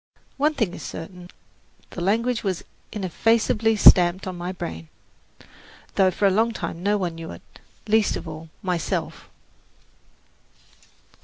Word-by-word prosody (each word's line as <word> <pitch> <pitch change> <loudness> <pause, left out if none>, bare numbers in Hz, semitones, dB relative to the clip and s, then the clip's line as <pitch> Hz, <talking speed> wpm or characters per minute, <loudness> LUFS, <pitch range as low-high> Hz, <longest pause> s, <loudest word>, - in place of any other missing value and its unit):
One 300 +2 +2
thing 220 -10 0
is - - -8
certain, 175 +2 -8 0.6
the 175 - -6
language 230 +6 +1
was 190 -4 -2 0.3
ineffaceably 220 +3 +1
stamped 180 -2 +6
upon 185 -1 -5
my 175 +1 -4
brain, 80 - -6 1.1
though 190 -1 +4
for 195 +3 -1
a 195 - +5
long 225 +4 +2
time 170 - -5
no 205 +2 +2
one 180 -4 -2
knew 165 0 -8
it, - - -10 0.4
least 215 0 +3
of - - -6
all 160 +1 -8
myself. 180 -3 -3
190 Hz, 135 wpm, -24 LUFS, 175-220 Hz, 1.1 s, stamped